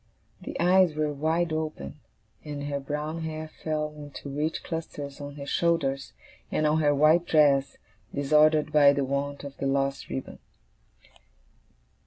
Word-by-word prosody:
The -, -, -6 dB
eyes 180 Hz, -2 st, +4 dB
were 150 Hz, -1 st, 0 dB
wide 160 Hz, +3 st, 0 dB
open, 155 Hz, -, -4 dB, 0.4 s
and 145 Hz, -1 st, -6 dB
her 145 Hz, -1 st, -2 dB
brown 150 Hz, +4 st, -4 dB
hair 155 Hz, -1 st, -5 dB
fell 150 Hz, -1 st, -2 dB
in 145 Hz, -1 st, -9 dB
two 140 Hz, -, -8 dB
rich 155 Hz, +2 st, -2 dB
clusters 145 Hz, -4 st, -6 dB
on 145 Hz, 0 st, -7 dB
her 140 Hz, -1 st, -7 dB
shoulders, 140 Hz, -4 st, 0 dB, 0.4 s
and 155 Hz, -, +1 dB
on 150 Hz, +1 st, +3 dB
her 145 Hz, -1 st, +3 dB
white 155 Hz, +4 st, +4 dB
dress, 140 Hz, -3 st, +3 dB, 0.3 s
disordered 150 Hz, +2 st, +3 dB
by 145 Hz, -2 st, +7 dB
the 140 Hz, -, 0 dB
want 140 Hz, +1 st, -3 dB
of 140 Hz, -1 st, -8 dB
the 135 Hz, -, -2 dB
lost 135 Hz, 0 st, -1 dB
ribbon. 130 Hz, -, -6 dB
150 Hz, 150 wpm, -27 LUFS, 140-155 Hz, 0.4 s, by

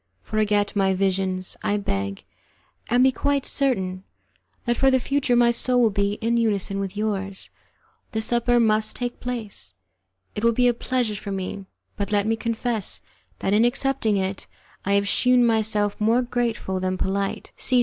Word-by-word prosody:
Forget 210 Hz, -1 st, 0 dB
my 190 Hz, -1 st, +2 dB
visions, 185 Hz, -1 st, -1 dB
I 205 Hz, -, 0 dB
beg, 100 Hz, -, -3 dB, 0.7 s
and 245 Hz, +2 st, +4 dB
be 265 Hz, -, +5 dB
quite 280 Hz, +1 st, 0 dB
certain 190 Hz, -10 st, 0 dB, 0.6 s
that 240 Hz, 0 st, +1 dB
for 270 Hz, +3 st, +4 dB
the 260 Hz, 0 st, +3 dB
future 275 Hz, -1 st, +1 dB
my 240 Hz, 0 st, +5 dB
soul 250 Hz, +1 st, +2 dB
will 230 Hz, -3 st, +4 dB
be 200 Hz, 0 st, 0 dB
in 230 Hz, +2 st, 0 dB
unison 200 Hz, -3 st, 0 dB
with 195 Hz, 0 st, -4 dB
yours. 195 Hz, -2 st, -3 dB, 0.6 s
The 220 Hz, -, -1 dB
supper 240 Hz, +2 st, +2 dB
must 215 Hz, -1 st, +2 dB
take 245 Hz, -1 st, -4 dB
place, 215 Hz, -, -3 dB, 0.6 s
it 210 Hz, -, -5 dB
will 235 Hz, 0 st, +4 dB
be 245 Hz, +2 st, +3 dB
a 245 Hz, -, +4 dB
pleasure 245 Hz, -2 st, -1 dB
for 205 Hz, 0 st, -6 dB
me, 190 Hz, 0 st, -4 dB, 0.3 s
but 200 Hz, 0 st, -3 dB
let 205 Hz, -1 st, +2 dB
me 225 Hz, +1 st, +1 dB
confess 225 Hz, -, -1 dB, 0.4 s
that 195 Hz, -, +1 dB
in 215 Hz, +2 st, +5 dB
accepting 240 Hz, -3 st, +1 dB
it 190 Hz, 0 st, -2 dB, 0.4 s
I 200 Hz, -, +1 dB
have 200 Hz, 0 st, +2 dB
shewn 250 Hz, +3 st, +4 dB
myself 215 Hz, -2 st, +1 dB
more 230 Hz, +4 st, +3 dB
grateful 235 Hz, -6 st, -2 dB
than 185 Hz, 0 st, -1 dB
polite. 195 Hz, +1 st, -2 dB
215 Hz, 165 wpm, -24 LUFS, 195-240 Hz, 0.7 s, be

